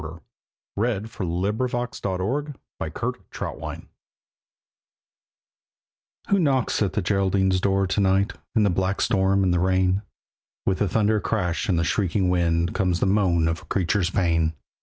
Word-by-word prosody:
THE - - -8 0.6
BALLAD 105 -2 0
OF 115 - -13
THE - - -4
LITTLE 110 - -2 0.3
BLACK - - -5 0.3
HOUND - - -6 2.4
Who 200 - +4
knocks 135 -10 +1
at 95 -3 +1
the 105 - -1
Geraldine's 95 -1 +1
door 95 0 +2
to 95 +2 -1
night 95 +1 +2 0.2
In 110 - +4
the 100 - +3
black 95 +2 0
storm 95 -1 +2
and 90 -2 +2
the 90 - +2
rain? 95 +1 +2 0.6
With 95 - +1
the 105 - +1
thunder 105 +2 +2
crash 100 0 -1
and 90 - +2
the 85 - +2
shrieking 95 +1 +1
wind 85 -1 +1
Comes 90 -3 +1
the - - +1
moan 95 -5 +2
of 80 +1 -1
a - - -16
creature's 95 -1 0
pain. 85 -4 +1
95 Hz, 150 wpm, -24 LUFS, 90-105 Hz, 2.4 s, Who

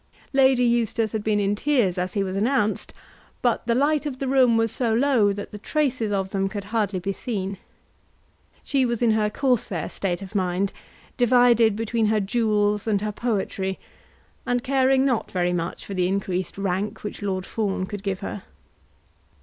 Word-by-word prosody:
Lady 265 -2 +4
Eustace 230 -2 +1
had 215 -2 -3
been 210 -1 +1
in 200 0 +1
tears 230 -5 +1
as 180 0 -2
he 200 - +1
was 190 -1 -4
announced, 215 0 0 0.5
but 240 -2 +1
the 235 - +2
light 295 +3 +2
of 265 -3 -5
the 270 - -3
room 255 -3 +4
was 225 -1 +2
so 240 -3 0
low 240 -5 +3
that 200 0 -6
the 210 - -8
traces 255 -4 -1
of 195 -1 -1
them 195 0 0
could 205 0 -5
hardly 205 -2 -1
be 195 +2 -2
seen. 195 -4 -4 1.0
She 275 -2 +1
was 235 -1 0
in 230 - +4
her 215 -1 +2
Corsair 210 - 0
state 190 0 -2
of 195 +2 -10
mind, 190 0 0 0.4
divided 245 -3 +4
between 225 0 0
her 215 0 +2
jewels 210 -1 +1
and 210 -2 +2
her 210 0 -2
poetry, 195 -4 -2 0.7
and 245 0 -1
caring 265 0 +3
not 250 -5 0
very 180 -1 0
much 170 -1 -3
for 200 - -6
the 180 -2 +1
increased 185 -1 -2
rank 200 +2 -2
which 210 - -6
Lord 190 -2 -2
Fawn 200 -4 -2
could 205 0 -6
give 195 -2 -3
her. 200 0 -5
210 Hz, 180 wpm, -24 LUFS, 195-245 Hz, 1.0 s, Lady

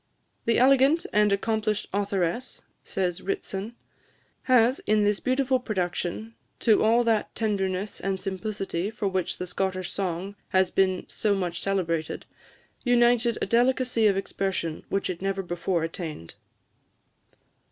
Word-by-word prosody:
"The 230 - +3
elegant 275 +5 +5
and 210 0 +4
accomplished 215 +1 0
authoress," 200 +3 -1 0.2
says 185 -1 -2
Ritson, 230 - -4 0.7
"has, 250 0 +4
in 215 0 +4
this 205 0 +2
beautiful 260 0 +1
production, 190 0 -3 0.3
to 220 -3 +4
all 230 +2 +4
that 225 -2 0
tenderness 200 -2 -1
and 195 -1 -2
simplicity 195 -1 -3
for 215 -2 -3
which 185 -2 -1
the 180 - -4
Scottish 185 0 -2
song 190 +1 -3
has 190 -1 +2
been 185 -1 +1
so 210 -2 0
much 175 -3 -2
celebrated, 170 -5 -1 0.6
united 240 -1 +3
a - - +2
delicacy 245 0 +2
of 195 -2 +2
expression 190 -4 -2
which 195 - 0
it 180 -1 -4
never 195 0 -1
before 175 -1 -1
attained." 160 - -5
200 Hz, 130 wpm, -26 LUFS, 185-230 Hz, 0.7 s, elegant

